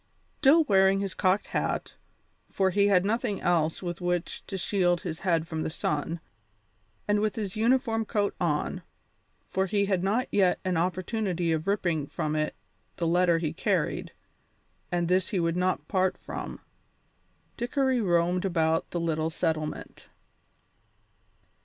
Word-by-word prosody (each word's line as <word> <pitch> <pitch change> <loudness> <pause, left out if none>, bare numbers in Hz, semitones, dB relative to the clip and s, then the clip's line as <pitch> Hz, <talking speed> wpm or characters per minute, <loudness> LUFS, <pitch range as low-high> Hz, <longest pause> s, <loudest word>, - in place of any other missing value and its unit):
Still 305 +3 +6
wearing 195 -6 +4
his 195 -1 -2
cocked 190 +2 +1
hat - - -2 0.6
for 190 -1 +1
he 200 +2 +3
had 190 -2 +4
nothing 215 -1 0
else 165 -1 +1
with 175 0 -4
which 175 0 -2
to 195 - -4
shield 175 -2 +1
his 165 -5 -5
head 165 -3 +1
from 160 -1 -3
the - - -2
sun 160 +1 -2 0.9
and 205 0 +3
with 215 0 0
his 205 -3 -4
uniform 225 0 +2
coat 205 -2 0
on, 150 -4 0 0.7
for 190 0 0
he 200 +1 +1
had 190 -3 0
not 220 +6 +1
yet 190 -3 +3
an 185 -1 0
opportunity 180 0 -1
of 160 +2 -1
ripping 175 -7 0
from 155 +2 -2
it 155 0 -1 0.4
the 170 - -2
letter 175 0 +3
he 165 -2 -2
carried, - - -1 0.8
and 175 -1 0
this 185 +1 +2
he 190 - 0
would 165 0 0
not 180 -4 0
part 185 -1 +1
from - - -7 0.9
Dickory 260 +1 +1
roamed 175 -1 +2
about 165 -4 +1
the 175 - -3
little 160 -1 0
settlement. 155 -1 -3
180 Hz, 145 wpm, -28 LUFS, 165-200 Hz, 0.9 s, Still